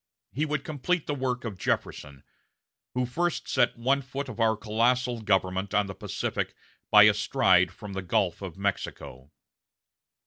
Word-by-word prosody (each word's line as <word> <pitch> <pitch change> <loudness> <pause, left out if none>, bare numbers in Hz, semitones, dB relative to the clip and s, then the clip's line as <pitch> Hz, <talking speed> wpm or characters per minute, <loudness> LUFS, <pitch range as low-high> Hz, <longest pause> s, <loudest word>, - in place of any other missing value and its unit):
he 150 +5 -1
would 150 -2 -2
complete 155 +3 -1
the 145 - -2
work 130 -2 -2
of 100 -5 -6
Jefferson, 70 -5 -3 0.7
who 125 0 +1
first 170 +7 -2
set 125 -2 +2
one 135 +4 +1
foot 135 +2 -5
of 120 -3 -8
our 110 -1 +3
colossal 120 +3 +1
government 95 -1 0
on 105 0 +3
the 95 - -6
Pacific - - -3 0.3
by 105 -1 +8
a 105 0 +7
stride 95 -4 +3
from 105 -2 -9
the 95 - -3
Gulf 95 -1 0
of 95 -3 -7
Mexico...." 90 -8 -4
110 Hz, 160 wpm, -27 LUFS, 95-130 Hz, 0.7 s, by